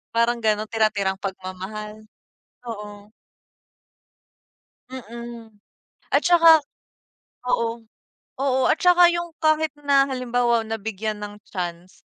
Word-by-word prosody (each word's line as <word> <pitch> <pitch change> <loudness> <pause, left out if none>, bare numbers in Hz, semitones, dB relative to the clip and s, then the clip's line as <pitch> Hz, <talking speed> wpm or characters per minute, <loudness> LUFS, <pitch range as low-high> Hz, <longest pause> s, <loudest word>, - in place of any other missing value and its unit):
Parang 235 +1 +2
gano'n, 215 0 +1
tira-tirang 210 -3 +1
pagmamahal, 200 +3 -7 0.6
oo. 210 -2 -8 1.8
Mm. 235 -2 -9 0.6
At - - +3
tsaka 330 -3 +6 0.9
oo, 230 -1 -1 0.5
oo 265 -1 +1
at - - +3
tsa, 360 +1 +5 0.2
yung 345 -1 -3
kahit 310 -1 +2
na 280 -1 +4
halimbawa 245 -3 0
nabigyan 220 -1 -4
ng 210 0 -8
chance 175 -1 -6
225 Hz, 95 wpm, -23 LUFS, 210-260 Hz, 1.8 s, tsaka